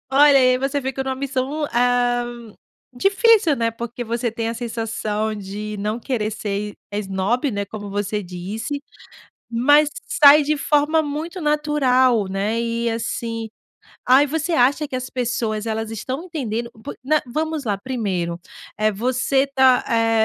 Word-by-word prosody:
Olha, 280 Hz, +1 st, +6 dB
aí 255 Hz, -1 st, +4 dB
você 275 Hz, +2 st, -1 dB
fica 265 Hz, 0 st, -2 dB
numa 265 Hz, 0 st, -2 dB
missão, 275 Hz, +2 st, -2 dB
ah, 245 Hz, 0 st, +2 dB, 0.7 s
difícil, 395 Hz, -, +4 dB
né? 230 Hz, 0 st, 0 dB
Porque 235 Hz, +1 st, -6 dB
você 235 Hz, +1 st, -2 dB
tem 225 Hz, 0 st, -3 dB
a 230 Hz, -, -3 dB
sensação 220 Hz, -2 st, -3 dB
de 210 Hz, +1 st, -6 dB
não 210 Hz, +3 st, -2 dB
querer 225 Hz, -4 st, -2 dB
ser, 205 Hz, -1 st, -4 dB, 0.2 s
eh, 205 Hz, -, -2 dB
esnobe, 205 Hz, +7 st, -1 dB
né, 200 Hz, -2 st, -2 dB
como 205 Hz, 0 st, -8 dB
você 205 Hz, +1 st, -2 dB
disse. 200 Hz, +10 st, -5 dB, 0.7 s
Mas 290 Hz, +5 st, +5 dB, 0.2 s
sai 295 Hz, -7 st, +7 dB
de 300 Hz, +1 st, 0 dB
forma 295 Hz, +2 st, +2 dB
muito 310 Hz, +5 st, -5 dB
natural, 275 Hz, -, +2 dB
né? 200 Hz, +4 st, -1 dB
E 235 Hz, 0 st, -1 dB
assim, 230 Hz, 0 st, -3 dB, 0.6 s
ah, 260 Hz, +2 st, +7 dB
e -, -, +2 dB
você 320 Hz, +3 st, -2 dB
acha 285 Hz, +2 st, +3 dB
que 260 Hz, -, -3 dB
as 255 Hz, 0 st, -4 dB
pessoas, 235 Hz, -4 st, -2 dB
elas 220 Hz, -1 st, -3 dB
estão 260 Hz, -, -4 dB
entendendo? 240 Hz, -9 st, -4 dB
Por -, -, -6 dB
não 305 Hz, +3 st, +3 dB
vamos 310 Hz, +4 st, -2 dB
lá, 205 Hz, -4 st, -1 dB
primeiro: 195 Hz, -8 st, -3 dB, 0.4 s
eh, 215 Hz, 0 st, +2 dB
você 255 Hz, +5 st, +1 dB
tá, 265 Hz, -2 st, +4 dB
eh, 225 Hz, -1 st, +3 dB
245 Hz, 155 wpm, -21 LUFS, 220-280 Hz, 0.7 s, sai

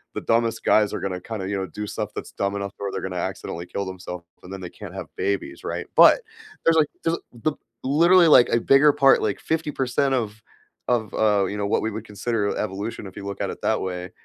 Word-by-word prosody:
the -, -, -3 dB
dumbest 115 Hz, 0 st, +1 dB
guys 105 Hz, -1 st, +3 dB
are -, -, -2 dB
gonna 95 Hz, -2 st, -3 dB
kinda, 105 Hz, -1 st, -5 dB
you 100 Hz, -, -1 dB
know, 95 Hz, -1 st, -3 dB
do 105 Hz, +6 st, -6 dB
stuff 105 Hz, 0 st, -4 dB
that's -, -, -6 dB
dumb 100 Hz, 0 st, -2 dB
enough 100 Hz, 0 st, -4 dB
or 100 Hz, -1 st, -3 dB
they're -, -, -3 dB
gonna 95 Hz, -1 st, -4 dB
accidentally 85 Hz, 0 st, -4 dB
kill 100 Hz, +3 st, -4 dB
themselves, 90 Hz, -2 st, -7 dB, 0.2 s
and 90 Hz, -, -11 dB
then 95 Hz, -, -7 dB
they 90 Hz, -, -6 dB
can't 100 Hz, -2 st, -10 dB
have 95 Hz, -4 st, -6 dB
babies," 100 Hz, +1 st, -2 dB
right? -, -, -4 dB
But -, -, +8 dB, 0.4 s
there 165 Hz, -, +6 dB
like, 160 Hz, -2 st, +4 dB, 0.2 s
there's 165 Hz, 0 st, +1 dB, 0.3 s
the 155 Hz, -, +2 dB, 0.3 s
literally 170 Hz, +6 st, +5 dB
like, 135 Hz, -6 st, +7 dB
a 115 Hz, -, +3 dB
bigger 135 Hz, +4 st, +6 dB
part 135 Hz, -1 st, +5 dB
like, 105 Hz, -2 st, -1 dB
50% 140 Hz, -4 st, 0 dB
of 110 Hz, -3 st, -3 dB, 0.5 s
of, 115 Hz, -4 st, 0 dB
uh, 105 Hz, -2 st, +3 dB
you 100 Hz, -, -4 dB
know, 100 Hz, -1 st, -1 dB
what -, -, +1 dB
we 110 Hz, -, -2 dB
would 110 Hz, +1 st, -6 dB
consider 105 Hz, 0 st, -2 dB
evolution 105 Hz, +1 st, -4 dB
if 95 Hz, -, -12 dB
you 100 Hz, -, -7 dB
look 100 Hz, -1 st, -5 dB
at -, -, -1 dB
it -, -, -10 dB
that -, -, +1 dB
way, 90 Hz, -1 st, -4 dB
105 Hz, 230 wpm, -24 LUFS, 95-120 Hz, 0.5 s, But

